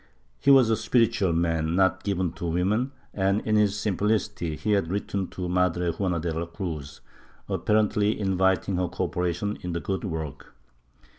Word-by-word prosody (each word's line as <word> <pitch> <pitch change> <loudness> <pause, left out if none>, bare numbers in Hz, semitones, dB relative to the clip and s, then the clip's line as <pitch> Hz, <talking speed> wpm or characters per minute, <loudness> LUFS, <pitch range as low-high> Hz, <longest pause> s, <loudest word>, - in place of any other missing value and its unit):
He - - +1
was 130 -5 +7
a - - +4
spiritual 115 -6 +2
man, 80 -1 0
not 95 0 +2
given 95 -4 0
to 85 0 -5
women 100 +10 0 0.2
and, 100 +1 +1
in 110 - 0
his 105 -1 +3
simplicity, 105 -4 -1
he 105 - -2
had 100 -5 +2
written 100 0 -2
to 90 -1 -5
Madre 90 -1 +1
Juana 90 0 -1
de 80 0 -2
la 80 +1 -3
Cruz, 80 -5 -6 0.5
apparently 105 0 +1
inviting 95 -1 +1
her 90 0 0
cooperation 90 +5 -2
in 90 -1 -4
the 85 - -1
good 95 +2 -3
work. 80 -7 -6
95 Hz, 160 wpm, -26 LUFS, 85-105 Hz, 0.5 s, was